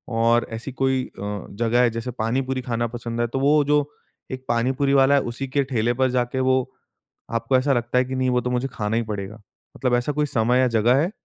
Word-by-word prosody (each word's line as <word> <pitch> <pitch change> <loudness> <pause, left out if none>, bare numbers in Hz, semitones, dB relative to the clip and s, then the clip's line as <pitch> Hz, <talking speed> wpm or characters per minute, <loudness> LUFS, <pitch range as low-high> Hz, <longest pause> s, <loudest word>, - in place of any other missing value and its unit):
और 115 +1 +3
ऐसी 120 +4 -6
कोई 130 0 0 0.2
अ, 105 0 -5
जगह 120 +1 +2
है 120 - +4
जैसे 115 +2 -4
पानी-पूरी 130 +3 -2
खाना 120 -1 -2
पसंद 120 0 -4
है 120 - +1
तो 135 +3 -3
वो 145 +1 +4
जो 150 +1 +3 0.5
एक 130 0 -6
पानी-पूरी 130 +4 +1
वाला 135 +1 +5
है 140 - +3
उसी 135 +3 -5
के 140 +1 +1
ठेले 120 -3 0
पर 130 +1 +1
जाके 125 +1 -1
वो 130 - +4 0.8
आपको 130 +3 +2
ऐसा 135 +2 +2
लगता 120 +1 0
है 130 - +2
कि 130 +1 -5
नहीं 130 0 +1
वो 125 0 +2
तो 125 - -3
मुझे 125 +2 0
खाना 105 +1 -1
ही 115 - +1
पड़ेगा। 105 0 -6 0.4
मतलब 125 -2 +1
ऐसा 125 +4 0
कोई 150 +1 +1
समय 125 +1 +2
या 130 - +4
जगह 115 +2 +3
है? 175 +5 -1
125 Hz, 230 wpm, -23 LUFS, 115-130 Hz, 0.8 s, वाला